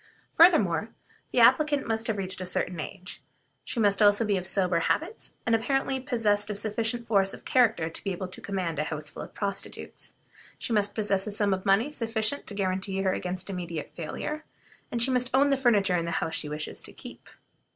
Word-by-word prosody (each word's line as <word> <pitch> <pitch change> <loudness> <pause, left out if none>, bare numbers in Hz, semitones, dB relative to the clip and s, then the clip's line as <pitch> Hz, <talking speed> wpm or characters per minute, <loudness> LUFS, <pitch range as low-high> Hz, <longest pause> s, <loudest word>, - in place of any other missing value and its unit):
Furthermore, 220 - +5 0.4
the - - +3
applicant 300 -2 +4
must 225 0 0
have 220 -3 -1
reached 190 -1 -2
a - - -3
certain 180 -1 0
age. 180 +3 -8 0.4
She 240 - -4
must 205 -2 +3
also 205 +2 +5
be 205 -1 +1
of 185 -1 -3
sober 185 -3 +2
habits, 340 - -2
and 230 - +1
apparently 265 +3 +1
possessed 215 -5 +1
of 210 - -3
sufficient 225 +3 -2
force 195 -3 +2
of - - -17
character 225 -10 +3
to 165 - -5
be 195 - -2
able 185 +1 -4
to - - -9
command 180 -6 -3
a 150 - 0
house 150 -1 -4
full - - -9
of - - -10
prostitutes. 200 -2 -3 0.4
She 235 - -4
must 205 -1 +2
possess 205 -2 0
a - - -3
sum 205 -1 +2
of 190 +1 -4
money 220 +9 +3
sufficient 225 0 -1
to 205 - -6
guarantee 190 0 -1
her 190 -1 +2
against 180 0 -4
immediate 170 -4 -5
failure, 300 - -5 0.5
and 235 -1 +1
she 260 - +3
must 250 0 +1
own 280 +1 +4
the - - +4
furniture 210 -8 +3
in 170 - -1
the - - -3
house 160 - -2
she 150 - -1
wishes 150 0 -4
to - - -9
keep. - - -12
205 Hz, 205 wpm, -27 LUFS, 185-230 Hz, 0.5 s, Furthermore